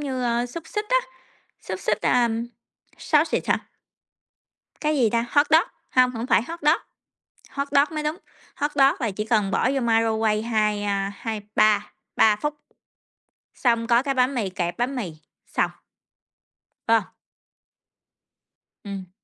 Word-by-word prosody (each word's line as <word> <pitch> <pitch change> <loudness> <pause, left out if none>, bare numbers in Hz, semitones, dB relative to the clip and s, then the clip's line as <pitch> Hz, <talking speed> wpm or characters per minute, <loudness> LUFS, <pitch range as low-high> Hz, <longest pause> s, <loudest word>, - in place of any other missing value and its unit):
như, 265 -3 -3
a, 240 +1 0
xúc 320 +6 -8
xích 420 0 -3
á, - - +4 0.6
xúc - - -6
xích, - - 0
à, 245 -1 +3 0.7
sausage 305 +1 +2
hả? - - -1 1.1
Cái 305 0 +1
gì 235 -5 +3
ta? 235 0 +1
Hot 285 +1 +4
dog? 320 +2 +5 0.2
Hông, 255 -1 +4
hổng 235 0 -5
phải - - +3
hot 335 +7 -7
dog. 300 - +4 0.7
Hot 280 0 -3
dog 290 +3 +3
mới 305 - -2
đúng, 305 +3 -2 0.4
hot 290 +1 -1
dog 275 -1 +5
là 230 -5 -1
chỉ 210 +2 -4
cần 210 -3 +1
bỏ 255 - +2
vô 275 - 0
microwave, 225 -1 +1
2, 210 -2 +1
a, 200 -1 -1
2-3, 210 -1 0 0.2
3 215 -1 +5
phút, 295 +7 -3 1.0
xong 230 -2 +1
có 240 0 +4
cái 275 -1 -1
bánh 255 +1 +2
mì 215 -7 -1
kẹp 175 -1 -3
bánh 255 +3 -1
mì, 195 -9 -4 0.3
xong. - - 0 1.2
Phải 225 0 +6
hông? 190 - -14 1.7
Ừm. 195 -3 -7
235 Hz, 155 wpm, -24 LUFS, 215-280 Hz, 1.7 s, Phải